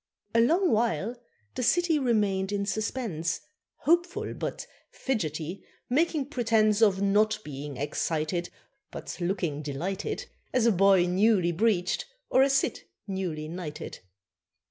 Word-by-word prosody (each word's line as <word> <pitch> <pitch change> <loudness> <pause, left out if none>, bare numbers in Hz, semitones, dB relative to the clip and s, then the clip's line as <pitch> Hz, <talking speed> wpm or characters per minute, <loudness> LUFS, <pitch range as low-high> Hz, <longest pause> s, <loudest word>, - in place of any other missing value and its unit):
A 230 - +5
long 340 +9 +3
while 230 0 +1 0.4
the - - -3
city 330 +5 +3
remained 205 -6 +1
in 200 -1 -1
suspense, 200 -6 -2 0.4
Hopeful, 345 +3 +1
but - - -4 0.2
fidgety, 170 - -3 0.3
making 305 +1 +2
pretence 225 -6 +2
Of 200 -3 +4
not 210 +2 +3
being 145 -1 -7
excited, 155 +4 -1 0.4
But - - -7
looking 175 -5 -1
delighted, 155 +7 -3 0.3
As 250 -3 +3
a 235 - +6
boy 195 -2 +5
newly 185 -1 +3
breeched, 195 - +1 0.3
or 260 - +5
a 275 - +5
cit 270 0 +1 0.2
newly 180 -6 -3
knighted. 160 -2 -6
200 Hz, 120 wpm, -28 LUFS, 175-235 Hz, 0.4 s, a